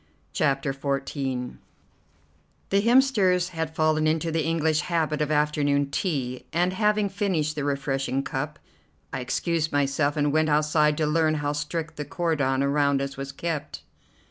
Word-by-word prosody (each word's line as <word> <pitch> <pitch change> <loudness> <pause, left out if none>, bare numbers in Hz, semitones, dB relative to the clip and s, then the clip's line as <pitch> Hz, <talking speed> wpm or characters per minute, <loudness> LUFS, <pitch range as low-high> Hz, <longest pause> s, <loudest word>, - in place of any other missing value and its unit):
CHAPTER 135 -1 +1
XIV 135 -2 -3 1.1
The 200 0 +4
Hemsters 210 -7 +3
had 160 -2 -4
fallen 155 -1 +2
into 160 +1 0
the 160 -1 0
English 160 -1 +1
habit 155 -2 -1
of 150 - 0
afternoon 145 -2 +1
tea, 135 -8 -2
and, 175 +3 +1
having 210 +1 +2
finished 190 -7 -1
the 150 - -2
refreshing 135 -1 -1
cup, 145 +3 -4 0.6
I - - -2
excused 155 +5 -1
myself 145 +1 +1
and 145 -1 +1
went 155 0 +2
outside 150 0 +3
to 155 - +1
learn 155 +1 +2
how 145 -1 -1
strict 155 +2 -4
the 150 - -4
cordon 140 -5 0
around 140 0 +2
us 140 0 -4
was 135 0 -6
kept. 160 +1 -4
150 Hz, 145 wpm, -25 LUFS, 140-165 Hz, 1.1 s, The